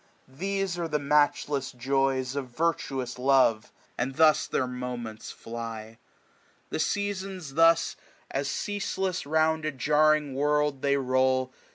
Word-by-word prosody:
These 190 +5 -3
are 170 - -1
the 150 -2 0
matchless 145 -1 +1
joys 135 +1 0
of 140 -2 -3
virtuous 130 -3 -2
love; 130 -4 +3 0.3
And 130 +2 -2
thus 155 -1 +4
their^monjents 125 -3 -4
fly. 115 -1 -7 0.7
The - - -2
Seasons 195 -6 -2
thus^ 165 +2 +5
SPRING. - - -18 0.3
45 135 - -1
As 140 - -3
ceaseless 190 +1 -2
round 160 +1 +2
a 155 - -1
jarring 150 +1 +2
world 150 0 +1
they 140 0 +2
roll. 130 -1 +1
140 Hz, 130 wpm, -27 LUFS, 130-160 Hz, 0.7 s, thus^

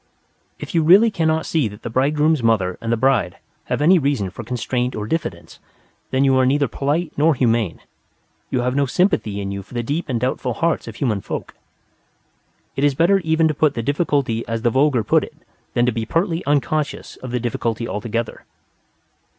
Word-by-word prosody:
If - - -8
you 165 - +3
really 195 +8 +6
cannot 160 -4 0
see 155 -8 +1
that 105 0 -11
the - - -4
bridegroom's 150 +4 +2
mother 105 -6 +1
and 115 0 -2
the 115 - +2
bride 125 -8 +1 0.3
have - - -1
any 180 +3 +6
reason 135 - -1
for 120 - -8
constraint 125 +1 -2
or 105 -1 -4
diffidence, 110 - -4 0.5
then 130 +1 +1
you 135 -1 +4
are 130 - +4
neither 140 +1 +2
polite 150 +6 -2
nor 155 +1 +4
humane: 115 -7 0 0.7
you 125 - 0
have 125 +1 -1
no 140 0 +2
sympathy 115 - +1
in 100 -1 -4
you 100 0 -4
for 105 - -14
the 120 - -1
deep 150 +6 -3
and 120 -3 0
doubtful 125 -1 -2
hearts 170 -1 0
of - - -7
human 110 -8 -1
folk." - - -6 1.2
It 135 - -2
is 145 -2 +3
better 175 +6 +4
even 160 -2 +2
to - - 0
put 150 -1 +1
the 115 - -2
difficulty 140 -4 0
as 115 0 -3
the 120 - +3
vulgar 130 -2 +2
put - - +3
it - - -10 0.4
than 120 - +3
to 125 - +2
be 110 -1 -4
pertly 165 - 0
unconscious 145 +1 -1
of 130 - -8
the 125 +1 -1
difficulty 115 -1 -2
altogether. 115 +2 -4
130 Hz, 195 wpm, -20 LUFS, 115-155 Hz, 1.2 s, really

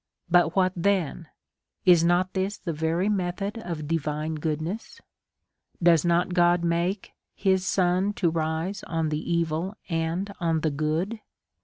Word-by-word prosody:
But 175 -2 +4
what 185 -1 +3
then? 175 -3 0 0.6
Is 175 -3 +6
not 175 +2 +2
this 195 +2 -1
the 170 - -4
very 160 +5 0
method 195 +2 -2
of 165 -8 -5
divine 155 0 -2
goodness? 155 +7 -4 0.8
Does 170 -3 +5
not 175 +1 +2
God 175 -1 +3
make 170 +4 -1 0.2
his 190 -1 +1
sun 185 +2 +2
to 175 -5 +1
rise 160 +4 -2
on 165 -2 -1
the 150 +3 -3
evil 170 +3 -1 0.2
and 165 +5 -1
on 165 -3 +1
the 155 - +1
good 155 +9 -1
175 Hz, 140 wpm, -26 LUFS, 160-185 Hz, 0.8 s, Is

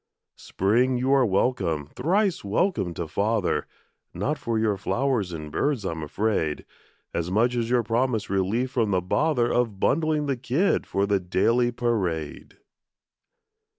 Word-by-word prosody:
Spring, 120 +7 +1
you 130 +2 +1
are 135 -1 +5
welcome, 95 - 0
thrice 185 - 0
welcome 100 - 0
to 85 -1 -5
father; 110 +7 0 0.5
Not 150 +2 -1
for 115 -1 -2
your 110 -2 +1
flowers 115 0 -1
and 75 -2 -7
birds, 140 - -1
I'm 80 -3 -3
afraid, 80 -2 -1 0.5
As 85 +1 -2
much 115 +6 +2
as 115 -1 -1
your 125 -1 +2
promised 115 -1 0
relief 100 +7 0
from 115 -5 +1
the 95 -2 +1
bother 125 - +1
Of 115 -5 0
bundling 155 +3 +1
the 135 -2 -1
kid 135 +10 0
for 100 +1 0
the 100 -1 +1
daily 115 +7 +1
parade. 95 -11 -2
115 Hz, 145 wpm, -25 LUFS, 95-130 Hz, 0.5 s, are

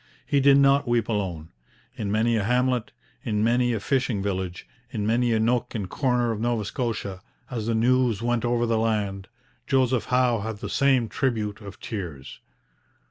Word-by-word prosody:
He 140 - +2
did 140 0 +6
not 140 0 +4
weep 120 -2 +1
alone. 90 -7 -2 0.5
In 100 -2 -3
many 115 +2 +2
a 110 - 0
hamlet, 125 +1 +1 0.3
in 105 -5 0
many 120 +2 +2
a 115 - -1
fishing 125 -2 0
village, 95 -2 -3 0.2
in 105 -4 -3
many 120 +2 +2
a 110 - +2
nook 120 +2 0
and 100 -4 -2
corner 125 +1 0
of 110 - -3
Nova 120 -3 0
Scotia, 105 -5 -3 0.3
as 115 -3 -3
the 115 - +1
news 120 -1 +2
went 120 0 0
over 120 0 +1
the 115 -1 +1
land, 100 -4 -1 0.4
Joseph 130 -4 +2
Howe 125 -2 +2
had 110 +1 -4
the - - -6
same 135 -4 +3
tribute 110 -7 -2
of 100 -1 -10
tears. 85 -11 -7
115 Hz, 175 wpm, -25 LUFS, 105-125 Hz, 0.5 s, did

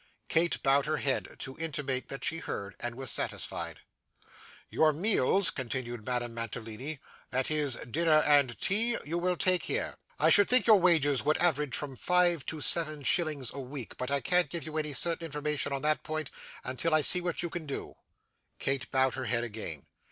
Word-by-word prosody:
Kate 170 +1 +1
bowed 140 +1 +3
her 155 0 0
head, 135 -2 0
to 130 - -6
intimate 140 -5 -3
that 135 - -7
she 165 - +1
heard, 100 - -6
and 120 0 -4
was 130 -3 0
satisfied. - - -2 0.9
'Your 155 -1 +2
meals,' 185 +1 +2
continued 120 -3 -4
Madame 120 0 -3
Mantalini, 115 +5 -5 0.3
'that 130 +3 0
is, 150 -4 0
dinner 155 +6 +1
and 140 -6 +3
tea, 230 +5 +2
you 165 +4 -2
will 180 0 0
take 185 0 +3
here. - - -1 0.2
I - - +3
should 205 -1 +5
think 250 -3 +6
your 215 -3 +6
wages 155 -7 +3
would 150 +2 +1
average 150 -6 +1
from 140 -3 -6
five 175 -1 +2
to 155 -2 -5
seven 155 -3 +3
shillings 150 -4 +1
a 140 - -7
week; 130 -2 -7
but 125 - -4
I 140 0 0
can't 180 -1 +1
give 170 -2 -4
you 155 -1 -7
any 150 -1 -2
certain 170 +3 +1
information 150 -2 -2
on 135 0 -3
that 155 0 +1
point, 155 -2 -4 0.3
until 155 +5 0
I 155 - +3
see 180 +5 +6
what 175 0 -2
you 170 - -4
can 165 -3 -6
do.' 140 - -5 0.6
Kate 135 -1 -2
bowed 130 -1 +2
her 130 -1 -4
head 120 -1 -1
again. 105 -10 -6
150 Hz, 190 wpm, -29 LUFS, 130-165 Hz, 0.9 s, think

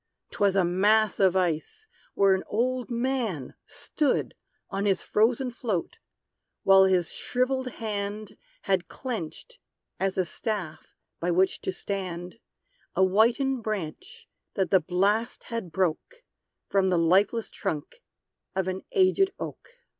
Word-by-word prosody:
'Twas 200 -1 +2
a 190 -2 +4
mass 205 +5 +3
of 190 -2 +4
ice, 185 - -1 0.3
where 195 -1 +5
an 190 - -1
old 250 +3 -1
man 235 - -2
stood 295 -3 -1 0.4
On 195 +1 -1
his 195 - +1
frozen 245 +4 +2
float; 220 -8 -3 0.6
while 195 0 +7
his 185 -3 +2
shrivelled 255 +1 -1
hand 210 -1 -4 0.3
Had 190 -2 0
clenched, 255 - -6 0.4
as 190 0 -1
a 185 - +2
staff 185 -5 -4 0.3
by 175 - -1
which 185 +2 +2
to - - -2
stand, 185 0 -5 0.6
A 190 - +4
whitened 235 +7 +3
branch 215 - -5 0.3
that 190 -2 0
the 190 - +6
blast 195 +7 0
had 215 -7 -4
broke 190 - -2 0.4
From 195 -1 +2
the 180 -2 +2
lifeless 195 +7 +2
trunk 155 - -4 0.5
of 190 -1 0
an 185 0 -2
aged 385 0 +4
oak. - - -7
200 Hz, 130 wpm, -27 LUFS, 185-235 Hz, 0.6 s, while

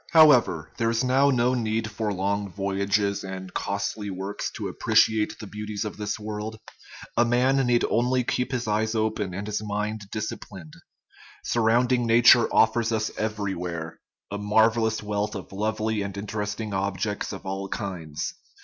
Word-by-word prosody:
However, 130 - +5
there 115 -1 +1
is 115 +2 +1
now 135 +2 +4
no 125 -1 +2
need 110 -2 -1
for 105 0 -2
long 100 +1 -1
voyages 100 +1 0
and 95 -1 -7
costly 100 +1 -2
works 95 +2 -4
to - - -3
appreciate 110 -1 +2
the 110 - -8
beauties 105 +1 -5
of 105 - -5
this 105 0 -3
world. 105 +1 -5 0.6
A 120 - +5
man 125 +3 +3
needs 120 -1 +3
only 125 +2 +2
to - - -2
keep 125 +1 -1
his 120 -3 -2
eyes 110 +1 0
open 110 -4 -1
and 100 +2 -4
his 105 0 -2
mind 105 +1 -2
disciplined. 100 -6 -6 0.7
Surrounding 120 +1 +2
nature 120 +1 +6
offers 115 +1 +3
us 110 -1 0
everywhere 90 -6 -3 0.3
a 100 - -3
marvellous 110 +1 +2
wealth 105 0 -2
of 95 - -7
lovely 110 +1 -1
and 100 0 -5
interesting 105 +1 -4
objects 100 +1 -2
of 95 - -8
all 95 0 -4
kinds. 85 -8 -4
105 Hz, 155 wpm, -26 LUFS, 100-115 Hz, 0.7 s, nature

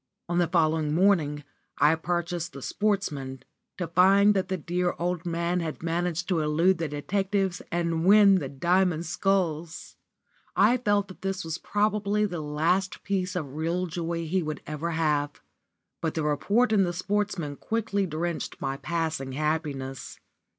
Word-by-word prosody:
On 175 0 0
the 175 - +3
following 155 -3 +1
morning 160 -6 +2 0.3
I 150 +2 +5
purchased 175 +1 -2
the 140 - -8
Sportsman, 150 -11 -2 0.3
to 180 - -2
find 195 +5 +5
that 190 -2 0
the 190 - -2
dear 175 +2 -1
old 175 0 -2
man 170 +1 0
had 160 -2 -5
managed 175 +1 -1
to 180 -3 +2
elude 165 +4 +2
the 165 - -1
detectives 190 +5 -1
and 170 -1 0
win 200 0 +7
the 140 -5 -5
Diamond 170 +4 +1
Sculls! 170 -2 -1 0.6
I 215 +6 +5
felt 205 -4 +1
that 190 - -12
this 195 -2 -3
was 160 0 -4
probably 210 0 +1
the 175 -5 -4
last 165 +6 0
piece 185 -2 -1
of 145 -7 -4
real 165 +4 -1
joy 170 -1 -3
he 180 +4 0
would 155 -2 -5
ever 150 +2 -3
have. 150 -3 0 0.6
But 160 - -2
the 160 - -1
report 200 +12 +2
in 200 -2 +5
the 175 -1 -1
Sportsman 185 -5 -2
quickly 205 -3 -1
quenched 165 +1 -3
my 135 0 -2
passing 160 -5 -2
happiness. 145 -3 -3
170 Hz, 155 wpm, -27 LUFS, 155-190 Hz, 0.6 s, win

